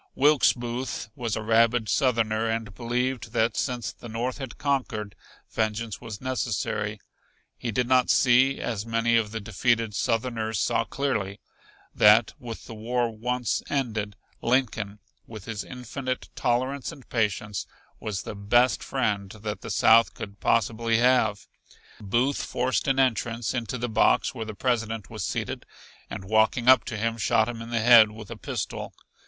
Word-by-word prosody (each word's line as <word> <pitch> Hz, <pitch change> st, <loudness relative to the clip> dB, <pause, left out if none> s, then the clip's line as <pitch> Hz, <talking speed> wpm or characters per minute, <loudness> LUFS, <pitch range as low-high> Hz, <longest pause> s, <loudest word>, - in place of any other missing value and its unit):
Wilkes 145 Hz, 0 st, +5 dB
Booth 120 Hz, -1 st, -4 dB
was 115 Hz, -3 st, -2 dB
a 110 Hz, -, -4 dB
rabid 115 Hz, +1 st, +3 dB
Southerner 115 Hz, -3 st, +1 dB
and 110 Hz, -2 st, -3 dB
believed 120 Hz, +1 st, -2 dB
that 110 Hz, 0 st, +1 dB
since 125 Hz, -3 st, -2 dB
the 120 Hz, -, -11 dB
North 120 Hz, +4 st, -3 dB
had 135 Hz, -3 st, -7 dB
conquered, 120 Hz, -7 st, -2 dB, 0.4 s
vengeance 110 Hz, 0 st, -2 dB
was 110 Hz, -3 st, -7 dB
necessary. 110 Hz, -4 st, -2 dB, 0.6 s
He 120 Hz, -, -5 dB
did 120 Hz, +3 st, 0 dB
not 130 Hz, -1 st, +3 dB
see, 130 Hz, +2 st, +4 dB
as 110 Hz, -4 st, -3 dB
many 115 Hz, +1 st, +1 dB
of 115 Hz, -2 st, +2 dB
the 110 Hz, +1 st, -4 dB
defeated 110 Hz, +2 st, 0 dB
Southerners 115 Hz, -1 st, -1 dB
saw 115 Hz, +3 st, +1 dB
clearly, 100 Hz, -6 st, -2 dB, 0.5 s
that 105 Hz, +1 st, +5 dB
with 115 Hz, -3 st, -8 dB
the -, -, -9 dB
war 120 Hz, +2 st, -1 dB
once 125 Hz, +2 st, -1 dB
ended 110 Hz, -7 st, -2 dB, 0.3 s
Lincoln, 115 Hz, -5 st, 0 dB, 0.3 s
with 110 Hz, -4 st, -10 dB
his 110 Hz, -3 st, -4 dB
infinite 125 Hz, +1 st, -5 dB
tolerance 130 Hz, +2 st, -1 dB
and 135 Hz, -, -14 dB
patience, 105 Hz, -3 st, -1 dB, 0.3 s
was 105 Hz, -3 st, -4 dB
the -, -, -6 dB
best 120 Hz, +5 st, +2 dB
friend 105 Hz, -7 st, -1 dB
that 105 Hz, -1 st, -4 dB
the -, -, -7 dB
South 115 Hz, +1 st, +5 dB
could 100 Hz, -1 st, -8 dB
possibly 115 Hz, +1 st, +1 dB
have. 120 Hz, -4 st, +2 dB, 0.5 s
Booth 120 Hz, +7 st, 0 dB
forced 125 Hz, +2 st, -1 dB
an 135 Hz, 0 st, +2 dB
entrance 120 Hz, -3 st, 0 dB
into 120 Hz, -1 st, -3 dB
the 120 Hz, +1 st, -2 dB
box 110 Hz, -, +2 dB
where 115 Hz, -4 st, -5 dB
the 110 Hz, -1 st, -7 dB
President 115 Hz, -3 st, -2 dB
was -, -, -5 dB
seated -, -, -3 dB, 0.5 s
and 95 Hz, -, -6 dB
walking 110 Hz, +4 st, +2 dB
up 130 Hz, -2 st, +7 dB
to 110 Hz, -, -4 dB
him 115 Hz, +2 st, -1 dB
shot 110 Hz, +1 st, +2 dB
him 120 Hz, -1 st, -5 dB
in 115 Hz, -, -8 dB
the 120 Hz, -1 st, 0 dB
head 115 Hz, -2 st, +8 dB
with 105 Hz, -1 st, -11 dB
a -, -, -5 dB
pistol. -, -, -5 dB
115 Hz, 160 wpm, -26 LUFS, 110-125 Hz, 0.6 s, head